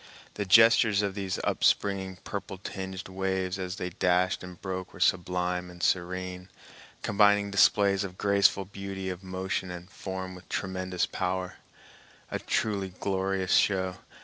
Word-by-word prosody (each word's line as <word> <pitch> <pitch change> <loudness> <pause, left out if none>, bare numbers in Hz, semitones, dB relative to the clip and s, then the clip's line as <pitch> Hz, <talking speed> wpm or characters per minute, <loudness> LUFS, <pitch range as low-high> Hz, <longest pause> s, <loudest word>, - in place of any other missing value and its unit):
The 105 - -3
gestures 110 0 +6
of 100 -1 -1
these 95 -2 -3
upspringing, 95 -2 +1
purple 100 -1 -5
tinged 95 0 -6
waves 95 0 -2
as 90 0 -3
they 90 -1 -4
dashed 90 +1 +1
and 90 -1 -9
broke 95 -1 -5
were - - -11
sublime 90 0 +1
and 90 0 -10
serene, 90 0 -1 0.5
combining 105 0 +4
displays 100 0 +4
of 95 -2 -7
graceful 100 -1 +3
beauty 95 -1 -5
of 90 0 -7
motion 95 0 -3
and 90 0 -8
form 95 -1 -5
with 90 0 -13
tremendous 95 -2 -1
power—a 90 0 -6
truly 100 -4 -1
glorious 95 -1 0
show. 95 -2 +2
95 Hz, 135 wpm, -28 LUFS, 90-100 Hz, 0.5 s, gestures